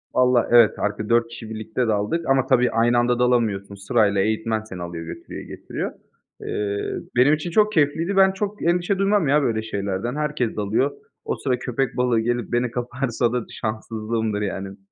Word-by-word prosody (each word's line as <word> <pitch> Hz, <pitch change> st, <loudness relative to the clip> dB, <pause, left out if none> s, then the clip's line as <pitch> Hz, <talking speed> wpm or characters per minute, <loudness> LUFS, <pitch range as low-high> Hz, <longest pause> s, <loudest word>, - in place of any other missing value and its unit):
Vallahi, 125 Hz, -1 st, +4 dB
evet, 120 Hz, -3 st, +6 dB
arka 105 Hz, +1 st, -2 dB
4 115 Hz, 0 st, +3 dB
kişi 115 Hz, -1 st, -9 dB
birlikte 110 Hz, +2 st, -2 dB
daldık 110 Hz, +11 st, 0 dB
ama 135 Hz, -1 st, +3 dB
tabii, 125 Hz, -1 st, +3 dB
aynı 120 Hz, +1 st, +3 dB
anda 120 Hz, 0 st, +2 dB
dalamıyorsun. 110 Hz, -5 st, +1 dB
Sırayla 100 Hz, 0 st, +2 dB
eğitmen 110 Hz, +1 st, 0 dB
seni 95 Hz, -5 st, -9 dB
alıyor, 85 Hz, -1 st, -6 dB
götürüyor, -, -, -8 dB
getiriyor. -, -, -5 dB, 0.5 s
Eee, 100 Hz, -1 st, -3 dB, 0.2 s
benim 130 Hz, +5 st, +5 dB
için 155 Hz, +3 st, -2 dB
çok 215 Hz, +3 st, +4 dB
keyifliydi. 165 Hz, +5 st, +1 dB
Ben 190 Hz, 0 st, +6 dB
çok 205 Hz, +2 st, -4 dB
endişe 175 Hz, +3 st, +1 dB
duymam 195 Hz, -4 st, +2 dB
ya 145 Hz, +2 st, +4 dB
böyle 115 Hz, -5 st, 0 dB
şeylerden. 100 Hz, +2 st, -3 dB
Herkes 150 Hz, -6 st, -1 dB
dalıyor. 110 Hz, +7 st, +1 dB, 0.3 s
O 445 Hz, -, -1 dB
sıra 125 Hz, -2 st, -1 dB
köpek 130 Hz, +1 st, -2 dB
balığı 125 Hz, -2 st, +2 dB
gelip 120 Hz, +1 st, -1 dB
beni 120 Hz, -1 st, 0 dB
kaparsa 125 Hz, -1 st, -1 dB
da 125 Hz, -2 st, -1 dB
şanssızlığımdır, 110 Hz, -1 st, -3 dB
yani. 95 Hz, -1 st, -4 dB
120 Hz, 170 wpm, -23 LUFS, 110-135 Hz, 0.5 s, evet